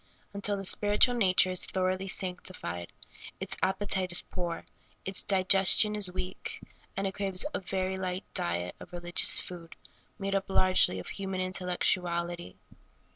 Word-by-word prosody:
Until 200 0 0
the 195 - -6
spiritual 205 +6 +4
nature 185 -5 +3
is 185 - -1
thoroughly 185 0 -1
sanctified, 180 - -3 0.5
its - - 0
appe 190 +2 -1
tite 185 -2 0
is 175 - -2
poor, 175 -2 -5 0.4
its 190 -1 -1
digestion 195 +2 +5
is 200 -3 0
weak, 185 - -6 0.4
and 195 - -1
it 195 - -2
craves 195 +3 +3
a - - -1
very 190 0 -2
light 185 0 -3
diet 85 +1 0
of 180 - -13
religious 175 0 +2
food, 170 -2 -9 0.4
made 195 -1 -3
up 195 0 -1
largely 185 - +3
of 90 - -7
human 195 -1 -4
intellectuality. 175 - -1
185 Hz, 145 wpm, -29 LUFS, 180-195 Hz, 0.5 s, digestion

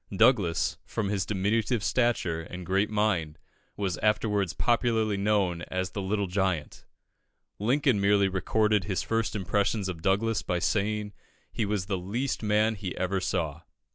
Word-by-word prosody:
Douglas, 95 -7 +3
from 105 -3 -3
his 100 -2 -1
diminutive 105 +3 0
stature 115 -11 +1
and 90 +2 -8
great 95 +3 +1
mind, 105 -8 0 0.4
was 95 -4 -2
afterwards 105 -3 +1
popularly 115 -3 +1
known 100 -4 +1
as 95 0 -2
the 100 - -4
Little 100 +1 0
Giant. 95 -4 -2 0.7
Lincoln 125 0 +2
merely 100 0 +4
recorded 105 +1 +1
his 95 -2 -1
first 115 -1 -1
impressions 100 +1 0
of 90 -3 -5
Douglas 100 +2 +1
by 90 +1 -1
saying 105 +2 -1 0.4
he 110 - -1
was 100 -3 -1
the 95 -1 -2
least 115 +9 -2
man 105 +1 +2
he 95 -4 -6
ever 95 +1 0
saw. 80 -4 -2
100 Hz, 145 wpm, -28 LUFS, 95-110 Hz, 0.7 s, merely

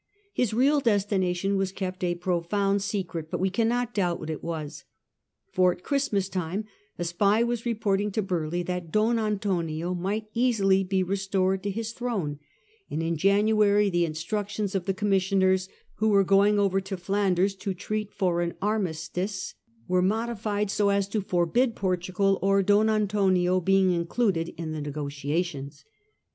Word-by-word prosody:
His 250 -4 +1
real 270 +6 +3
destination 195 -4 +1
was 195 -1 0
kept 185 -1 -5
a 175 -1 +1
profound 190 +3 0
secret, 185 -5 -3
but - - -3
we 190 0 +1
cannot 240 +3 0
doubt 180 -4 0
what 155 - -5
it 155 - -6
was. 155 -3 -5 0.7
For 185 -1 +4
at 180 - -9
Christmas 220 -9 0
time 185 +2 -3 0.3
a 175 - -2
spy 200 +6 +2
was 240 0 -2
reporting 210 -3 0
to 215 - 0
Burleigh 175 -2 -2
that 180 -2 -4
Don 225 +2 +2
Antonio 180 -6 -1
might 195 +5 -2
easily 205 -6 +3
be 190 0 0
restored 190 0 0
to 205 - -3
his 225 +3 -3
throne; 205 -13 -3 0.5
and 160 - -2
in 165 0 0
January 205 +3 +3
the 175 -1 +2
instructions 200 +5 -3
of 190 -3 -1
the 195 - 0
commissioners, 190 -1 +2 0.3
who 220 +1 +2
were 200 -2 +5
going 200 +2 +4
over 195 -1 +2
to 195 0 -5
Flanders 195 +1 +1
to 195 -1 -3
treat 210 +3 -3
for 175 -4 0
an 170 0 -2
armistice, 190 -1 -2 0.3
were 180 0 +2
modified 210 0 -1
so 205 -1 +2
as 200 -1 +1
to 215 +1 -1
forbid 195 +7 +1
Portugal 185 +1 0
or 195 0 +3
Don 205 +3 +4
Antonio 195 -4 +2
being 190 +1 +3
included 170 0 0
in 165 -2 -4
the 155 -1 -4
negotiations. 145 0 -4
195 Hz, 155 wpm, -26 LUFS, 175-210 Hz, 0.7 s, were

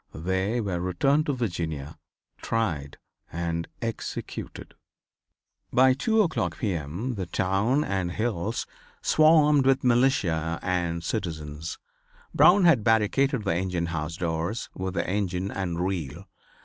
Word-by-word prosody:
They 95 +7 -1
were 95 -6 -2
returned 135 - +1
to 145 - +1
Virginia, 85 - -3 0.5
tried 80 -12 -2 0.3
and 85 0 -2 0.2
executed. 115 -1 -6 1.0
By 130 +1 +5
2 220 - +2
o'clock 90 - -2
P. 105 -4 -1
M., 85 - -4
the 95 -5 -4
town 100 - +1
and 95 -3 -2
hills 110 0 -2 0.4
swarmed 150 -3 +5
with 135 0 +3
militia 120 - +2
and 85 -2 -1
citizens. 80 -6 -4 0.6
Brown 190 +2 +6
had 160 -11 +5
barricaded 115 +3 +2
the 95 - +1
engine 90 -1 -1
house 80 +1 -3
doors 85 +5 -2
with 95 0 -4
the - - -1
engine 95 -1 -1
and 90 -3 -3
reel. 85 -9 -4
95 Hz, 125 wpm, -26 LUFS, 85-120 Hz, 1.0 s, Brown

